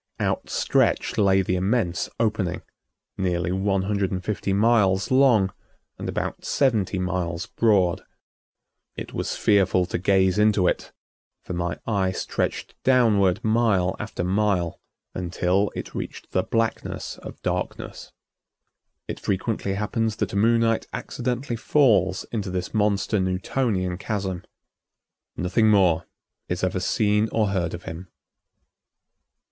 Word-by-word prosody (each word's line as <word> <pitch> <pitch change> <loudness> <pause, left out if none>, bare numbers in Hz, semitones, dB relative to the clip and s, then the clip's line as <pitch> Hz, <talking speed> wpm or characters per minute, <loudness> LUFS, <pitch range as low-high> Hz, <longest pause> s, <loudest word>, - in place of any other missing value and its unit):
Outstretched - - 0
lay 95 -1 +4
the 90 - 0
immense 95 -2 0
opening, 105 -6 0 0.6
nearly 90 -2 0
one 95 0 0
hundred 100 -1 0
and 95 -1 -4
fifty 105 -2 -2
miles 100 -2 +3
long 120 -8 +4 0.5
and - - -4
about - - -3
seventy 110 -8 +1
miles 90 -2 -2
broad. 100 -6 +2 0.9
It - - -7
was - - -2
fearful 95 -3 +3
to 90 - -3
gaze 95 +1 +3
into 105 -3 +4
it, - - -1 0.5
for - - -6
my 85 -2 -2
eye 100 -4 +1
stretched - - -3
downward 110 -8 +3
mile 110 -5 +2
after 105 -4 -4
mile 95 -2 0 0.3
until 90 +2 0
it - - -6
reached - - -6
the 95 - +2
blackness 115 +3 -2
of - - -10
darkness. - - -4 1.0
It - - -5
frequently 100 0 -1
happens 110 +2 -1
that - - -3
a - - -3
Moonite 115 +2 +2
accidentally 125 0 -3
falls 105 - +3
into 105 -4 -2
this 90 -1 -4
monster 105 0 +1
Newtonian 95 0 -1
chasm. 95 -4 -3 0.9
Nothing 105 +5 +2
more 90 -6 +3 0.4
is 90 +1 -2
ever 95 0 0
seen 105 +2 +1
or 110 -3 +1
heard 90 -4 -1
of 85 - -10
him. 85 +3 -7
95 Hz, 125 wpm, -24 LUFS, 90-110 Hz, 1.0 s, lay